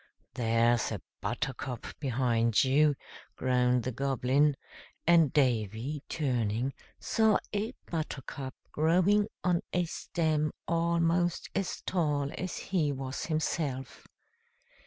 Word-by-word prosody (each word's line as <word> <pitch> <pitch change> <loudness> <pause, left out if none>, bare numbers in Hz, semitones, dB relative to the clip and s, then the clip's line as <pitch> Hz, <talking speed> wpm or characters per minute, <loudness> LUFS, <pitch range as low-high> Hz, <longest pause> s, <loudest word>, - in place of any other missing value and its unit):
"There's 115 0 +2
a - - -3 0.2
buttercup 130 -2 -3
behind 120 -3 +2
you," 145 +2 +4 0.4
groaned 125 -1 +2
the 130 - -2
Goblin, 135 +2 +2 0.5
and 165 -4 +5
Davy, 125 +1 0
turning, 125 -3 0 0.3
saw 220 -1 +3 0.2
a 215 +5 -2
buttercup 140 -4 -5 0.2
growing 185 +7 +3 0.2
on 175 -1 +2
a 180 0 +2
stem 155 -2 -1
almost 170 +1 +1
as 195 -2 -2
tall 150 -5 0
as 185 -1 -4
he 165 -7 0
was 135 -1 -4
himself. 155 -4 -2
145 Hz, 100 wpm, -30 LUFS, 125-170 Hz, 0.5 s, and